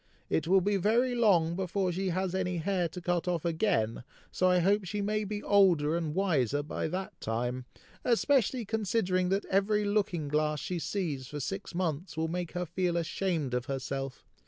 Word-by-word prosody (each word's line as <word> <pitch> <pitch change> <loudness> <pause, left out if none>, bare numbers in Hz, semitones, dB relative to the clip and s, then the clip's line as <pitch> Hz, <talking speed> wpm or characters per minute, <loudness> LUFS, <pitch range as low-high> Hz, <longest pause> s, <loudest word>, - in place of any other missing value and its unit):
It 160 - +1
will 190 +2 +5
be 200 +2 +1
very 235 +6 +2
long 180 -9 +3
before 185 0 -1
she 190 +2 -1
has 185 +1 -1
any 180 -1 -1
hair 180 +1 0
to 180 - -7
cut 175 0 -1
off 175 -2 -1
again, 160 - 0 0.3
so 185 - +2
I 180 - +4
hope 200 +4 +3
she 205 +3 -4
may 210 +1 0
be 205 +1 -4
older 175 -7 +4
and 165 -2 -2
wiser 145 - +1
by 150 - -3
that 185 +4 -5
time, 120 +3 -2 0.4
especially 250 -1 +2
considering 190 -4 0
that 195 +2 0
every 205 +2 +1
looking 200 -7 0
glass 150 +1 0
she 180 +3 -3
sees 155 -9 -3
for 150 +2 -6
six 195 +5 -5
months 170 -1 -2
will 160 0 0
make 175 0 -3
her 180 0 -2
feel 175 +1 -1
ashamed 165 -5 -1
of 125 0 -1
herself. 135 0 -4
180 Hz, 180 wpm, -30 LUFS, 155-195 Hz, 0.4 s, will